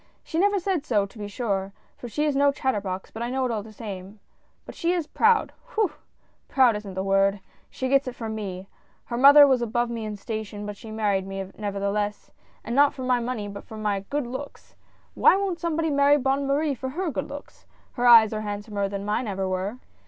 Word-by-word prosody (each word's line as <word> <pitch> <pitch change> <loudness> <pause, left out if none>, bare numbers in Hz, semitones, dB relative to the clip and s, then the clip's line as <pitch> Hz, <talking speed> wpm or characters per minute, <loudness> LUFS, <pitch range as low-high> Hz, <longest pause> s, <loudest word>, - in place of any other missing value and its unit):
" - - -40
She 320 - -3
never 405 +2 +3
said 360 -4 -1
so, 210 -8 +1
to 200 +4 -15
be 205 - -4
sure 200 -3 -2
— - - -38
for 245 - -7
she 300 +6 -1
is 295 -2 0
no 280 +1 +4
chat 265 -1 -1
terbox, 190 -2 -4
but 220 - -6
I 240 - -2
know 260 +1 0
it 250 - -1
all 220 -2 -2
the 215 +2 -12
same 200 -2 -8 0.2
— - - -41
but - - -9
she 340 +1 0
is 345 -3 -1
proud, 450 +8 +2 0.2
whew! 430 -6 +2 0.6
proud 255 -5 +4
isn't 205 -2 -7
the 190 - -2
word 195 +1 +2 0.2
— - - -35
she 260 - -3
gets 275 +2 +3
that 255 -1 -5
from 225 -2 -5
me. 195 -3 -5 0.4
Her 235 - -4
mother 285 +3 +9
was 260 -3 +3
above 240 +1 0
me 230 -2 -4
in 210 -1 -4
station, 210 0 -5
but 205 0 -5
she 220 - -11
married 205 -3 0
me, 195 0 -5
nevertheless 205 0 -3 0.2
— - - -34
and 235 - -3
not 285 +1 +5
for 260 - -6
my 250 -1 +2
money 235 -3 -3
but 200 0 -8
for 220 - -10
my 210 -2 -1
good 290 -2 -1
looks. 260 +4 -8 0.2
— - - -36
Why - - +7
won't 385 -3 -1
somebody 325 -1 -1
marry 285 +1 +5
Bonne 270 +1 0
Marie 290 +1 +1
for 260 0 -5
her 340 +4 -2
good - - -4
looks? 285 +1 -11
— - - -34
her 245 -2 +1
eyes 225 -2 +8
are 215 - -2
handsomer 205 -1 -3
than 200 0 -5
mine 215 +4 -1
ever 195 -1 -2
were 185 +5 -2
230 Hz, 240 wpm, -25 LUFS, 205-280 Hz, 0.6 s, mother